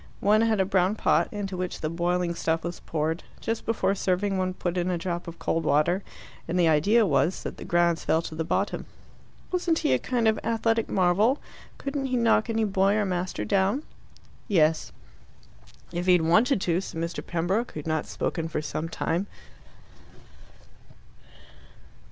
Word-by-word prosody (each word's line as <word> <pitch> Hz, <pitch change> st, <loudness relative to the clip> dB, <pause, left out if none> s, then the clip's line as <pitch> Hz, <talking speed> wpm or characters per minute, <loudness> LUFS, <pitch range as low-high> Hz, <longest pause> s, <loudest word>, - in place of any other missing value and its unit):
One 210 Hz, +2 st, +4 dB
had 225 Hz, -2 st, +2 dB
a 190 Hz, -, +3 dB
brown 190 Hz, +1 st, +2 dB
pot, -, -, +2 dB
into 200 Hz, -2 st, -4 dB
which 180 Hz, 0 st, -4 dB
the 155 Hz, -, -1 dB
boiling 175 Hz, +1 st, 0 dB
stuff 165 Hz, -1 st, -1 dB
was 175 Hz, 0 st, -5 dB
poured. 160 Hz, +2 st, -2 dB, 0.2 s
Just 225 Hz, 0 st, -3 dB
before 225 Hz, -3 st, +1 dB
serving 195 Hz, +1 st, 0 dB
one 185 Hz, -1 st, -1 dB
put 175 Hz, -1 st, -2 dB
in 180 Hz, 0 st, 0 dB
a 180 Hz, -, 0 dB
drop 175 Hz, 0 st, -4 dB
of 170 Hz, 0 st, -8 dB
cold 165 Hz, -, -1 dB
water, 160 Hz, +6 st, +2 dB, 0.5 s
and 175 Hz, +2 st, 0 dB
the 170 Hz, -, +4 dB
idea 200 Hz, +9 st, +4 dB
was 170 Hz, +1 st, +1 dB
that -, -, -6 dB
the -, -, -8 dB
grounds 170 Hz, -1 st, +2 dB
fell 160 Hz, +1 st, +1 dB
to 160 Hz, -, -7 dB
the 160 Hz, +1 st, -2 dB
bottom. 195 Hz, +5 st, -1 dB, 0.6 s
"Wasn't 350 Hz, -3 st, +1 dB
he -, -, +4 dB
a 130 Hz, -, +2 dB
kind 240 Hz, -, 0 dB
of 220 Hz, -, +2 dB
athletic 225 Hz, 0 st, 0 dB
marvel? 195 Hz, +8 st, +3 dB, 0.4 s
Couldn't 275 Hz, 0 st, -3 dB
he 255 Hz, -1 st, 0 dB
knock 230 Hz, -1 st, +3 dB
any 225 Hz, 0 st, +1 dB
boy 195 Hz, -1 st, +2 dB
or 215 Hz, -1 st, +1 dB
master 180 Hz, -, -2 dB
down?" 195 Hz, -, +1 dB, 0.6 s
"Yes." 160 Hz, -6 st, +2 dB, 1.0 s
"If 175 Hz, +1 st, -3 dB
he 180 Hz, -, +7 dB
had 175 Hz, -, +4 dB
wanted 195 Hz, -, +3 dB
to," 175 Hz, 0 st, +1 dB
said 165 Hz, -, -6 dB
Mr. 170 Hz, +1 st, -3 dB
Pembroke, 185 Hz, +8 st, -1 dB
who -, -, -5 dB
had -, -, -18 dB
not 155 Hz, -1 st, -1 dB
spoken 165 Hz, -1 st, -2 dB
for 160 Hz, -, -2 dB
some 155 Hz, +2 st, -3 dB
time. 170 Hz, +4 st, -1 dB
180 Hz, 175 wpm, -26 LUFS, 165-210 Hz, 1.0 s, he